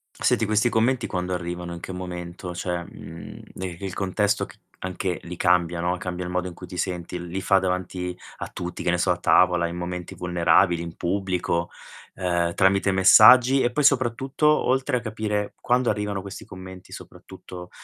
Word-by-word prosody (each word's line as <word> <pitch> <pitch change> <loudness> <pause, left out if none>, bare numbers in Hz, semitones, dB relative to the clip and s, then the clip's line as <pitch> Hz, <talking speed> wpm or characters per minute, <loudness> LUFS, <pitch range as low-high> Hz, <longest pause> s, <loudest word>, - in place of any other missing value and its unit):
Senti 110 - +1
questi 110 +3 +2
commenti 120 +2 +1
quando 90 -1 -3
arrivano, 90 -1 -4
in 85 - -7
che 95 - -7
momento? 90 -1 -6
Cioè, 85 0 -3
mhmm, 80 0 -10
de 90 -2 -6
il 95 -2 -5
contesto 100 +1 0
c - - -16 0.2
anche 90 -2 -3
lì 90 +1 -7
cambia, 85 -1 +2
no, 90 +1 0
cambia 90 0 -5
il 90 - -5
modo 90 0 -1
in 90 - -7
cui - - -10
ti 90 - -8
senti, 90 -1 -3
li 95 +3 -4
fa 95 0 +4
davanti 90 -1 -3 0.2
a - - -5
tutti, 90 0 -6
che - - 0
ne 90 - +1
so, 90 +1 +2
a 90 - 0
tavola, 90 -1 +3
in 85 - -6
momenti 90 0 -5
vulnerabili, 85 0 +2
in 85 0 -7
pubblico, 90 -2 -1 0.5
uhm, 85 -2 0
tramite 100 +2 +3
messaggi? 125 +8 +7
E 120 - +1
poi 150 - +1
soprattutto, 135 +2 +2
oltre 130 -4 +2
a - - -1
capire 110 -2 -3
quando 125 0 +2
arrivano 105 -2 -2
questi 100 0 -9
commenti, 95 0 -11
soprattutto, 90 -1 -11
90 Hz, 180 wpm, -24 LUFS, 90-105 Hz, 0.5 s, messaggi